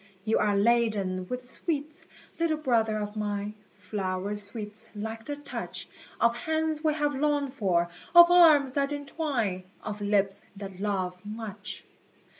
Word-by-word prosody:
You 220 - +2
are 205 -1 +2
laden 205 -4 +2
with 250 +2 -4
sweets, 300 +4 -3 0.3
little 330 -2 +1
brother 230 -7 +1
of 210 0 -4
mine, 205 -1 -2 0.2
Flower 195 0 -3
sweets, 210 +1 -2
like 220 +2 -5
the 290 - -3
touch 285 -1 -6 0.3
Of 235 0 +3
hands 315 +3 -1
we 305 -1 +2
have 295 -1 0
longed 285 -1 0
for, 180 -8 +1 0.3
of 345 0 +10
arms 305 -7 +7
that 280 0 0
entwine, 280 - -2 0.2
Of 210 -1 -5
lips 200 -1 +2
that 195 -2 -8
love 185 -3 -2
much. 210 -1 -6
220 Hz, 140 wpm, -28 LUFS, 205-290 Hz, 0.3 s, of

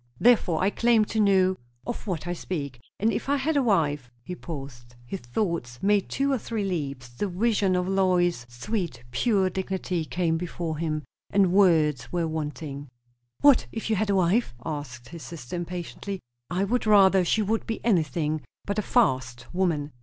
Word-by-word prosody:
"Therefore 205 -9 +4
I 195 - +3
claim 230 -2 +3
to 220 - -2
know 190 -2 +4 0.3
of 240 - -5
what 175 -5 -2
I 175 - -2
speak. 140 -8 -5 0.2
And 220 +3 +2
if - - -3
I 285 - +3
had 300 +4 0
a 285 - +4
wife 150 - +1
" 120 - -37
he 180 - -6
paused. 135 -8 -8
His 190 +10 -5
thoughts 125 - -2
made 205 -1 +2
two 275 +1 0
or 265 - +1
three 220 -1 -3
leaps; 140 -9 -3
the 120 +12 -3
vision 195 0 +1
of 180 0 0
Lois's 180 -8 +2
sweet, 165 - -3
pure 195 - +2
dignity 185 -2 -2
came 165 -1 0
before 165 -2 -4
him, 155 -2 -1 0.3
and 195 -3 +3
words 155 - +3
were 170 -2 0
wanting. 150 -2 -5 0.5
"What 285 -3 +6
if 225 0 -4
you - - +3
had 210 +1 0
a 200 - +3
wife?" 185 - +2
asked 135 -6 -6
his 170 -1 -9
sister 155 -4 -7
impatiently. 180 +3 -5 0.3
"I 180 +2 0
would 225 +3 0
rather 195 -3 +6
she 215 +5 +2
would 220 +2 -1
be 225 - -2
anything 155 - +1 0.2
but 205 +1 -1
a - - +2
'fast' 130 - 0
woman." 165 -6 0
180 Hz, 180 wpm, -26 LUFS, 150-205 Hz, 0.5 s, What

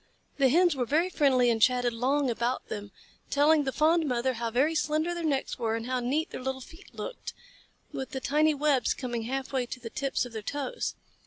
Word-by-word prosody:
The 270 -1 +5
Hens 345 +3 +4
were 250 -3 -1
very 330 +7 +2
friendly 255 -6 +3
and 225 -1 -1
chatted 245 0 +3
long 270 +4 +1
about 235 +2 -2
them, 205 -1 -6 0.4
telling 295 +1 +4
the 265 - 0
fond 315 +3 +3
mother 255 0 0
how 230 -1 -3
very 265 +8 +2
slender 310 +2 0
their 345 -1 -4
necks 280 -5 -1
were 225 -2 0
and 225 0 -4
how 255 0 -1
neat 275 +6 -1
their - - -6
little 265 +1 -3
feet 325 +8 -14
looked, - - -6 0.6
with 265 - -5
the 265 - -4
tiny 300 +3 +2
webs 285 -3 +2
coming 240 -3 -4
half 265 +2 -3
way 255 -2 0
to 250 - -6
the 230 -2 -8
tips 275 -3 -1
of 245 - -10
their 220 - -4
toes. 290 - -3
265 Hz, 215 wpm, -28 LUFS, 245-300 Hz, 0.6 s, The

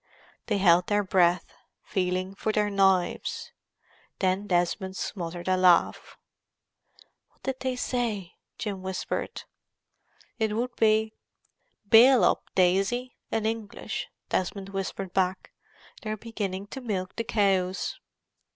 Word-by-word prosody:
They 210 - +1
held 180 -2 +5
their 205 0 +2
breath, 180 -2 +2 0.3
feeling 185 -1 -1
for 215 +2 -2
their 210 -1 +1
knives. 190 -3 +1 0.7
Then 190 +2 0
Desmond 185 +1 0
smothered 175 -2 -5
a 185 - +3
laugh. 180 -2 +3 1.1
"What - - -37
did 265 -1 -3
they 260 -1 -2
say?" 230 -8 -2 0.2
Jim 200 -4 -4
whispered. 185 -1 -4 1.0
"It 220 -1 +1
would 245 +2 -2
be 220 0 +3 0.7
'Bail 245 +4 +7
up, - - +2
Daisy!' 195 +7 +2
in 220 -1 -1
English," 220 -2 -4 0.2
Desmond 190 +1 -2
whispered 195 -1 -4
back. 185 -1 0 0.5
"They're 215 0 -3
beginning 200 -4 -4
to 265 - -7
milk 190 -6 -3
the 230 - -2
cows." 195 -5 0
195 Hz, 115 wpm, -27 LUFS, 185-220 Hz, 1.1 s, Bail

